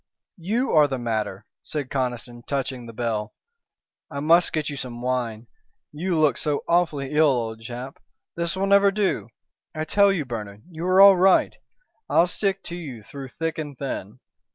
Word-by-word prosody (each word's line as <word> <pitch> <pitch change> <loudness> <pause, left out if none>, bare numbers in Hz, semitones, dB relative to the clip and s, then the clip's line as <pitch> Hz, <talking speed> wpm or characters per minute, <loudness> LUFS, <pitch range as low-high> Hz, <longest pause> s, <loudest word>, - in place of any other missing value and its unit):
"You 225 +10 -1
are 150 -2 +6
the 135 -2 -3
matter," 110 -4 -3 0.2
said 145 -4 -4
Conniston, 125 -2 -3
touching 130 -3 -3
the - - -8
bell. 110 -1 -3 0.7
"I 140 - -5
must 165 +4 +4
get 155 -2 -1
you 145 - -4
some 125 -3 -6
wine. 120 -3 -2 0.5
You 170 +3 -2
look 155 -2 +3
so 150 -2 -1
awfully 155 -6 +1
ill, 155 +1 +4
old 115 -4 -1
chap. 125 +4 -7 0.4
This 170 +1 -2
will 190 +1 0
never 200 0 +5
do. 195 - -1 0.5
I 155 0 -2
tell 200 +5 +4
you, 170 -7 -1
Bernard, 105 -4 -7
you 165 +2 -4
are 185 +1 +4
all 195 -1 +9
right. 190 +1 +4 0.5
I'll 170 - +5
stick 195 +2 -1
to 170 - -6
you 135 -11 -8
through 135 +4 -8
thick 165 +4 -4
and 145 -3 -6
thin." 125 -4 -5
145 Hz, 175 wpm, -24 LUFS, 120-170 Hz, 0.7 s, all